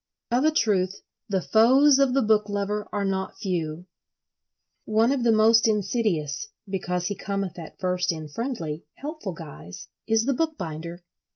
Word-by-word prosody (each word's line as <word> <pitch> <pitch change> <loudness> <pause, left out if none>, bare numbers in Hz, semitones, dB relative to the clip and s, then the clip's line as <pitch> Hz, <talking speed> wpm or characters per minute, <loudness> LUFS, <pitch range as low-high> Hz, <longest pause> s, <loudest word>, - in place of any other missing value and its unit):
Of 245 +3 +3
a - - +6
truth, 200 -9 +1 0.3
the 190 -3 0
foes 265 +6 +5
of 270 -2 +3
the 275 - +3
book 210 -1 +2
lover 205 +1 -2
are 205 -1 -1
not 190 -1 -2
few. 170 -3 -3 1.0
One 220 +3 +3
of 275 -3 0
the 235 - +4
most 225 +1 +5
insidious, 200 - 0 0.2
because 180 -2 -2
he 205 - -1
cometh 195 -3 -4
at 160 - -10
first 180 -1 0
in 160 -2 -6
friendly, 165 - -4
helpful 295 - -6
guise, 145 - -10 0.2
is 225 0 +2
the 275 - +2
bookbinder. 175 - -4
205 Hz, 155 wpm, -25 LUFS, 180-230 Hz, 1.0 s, a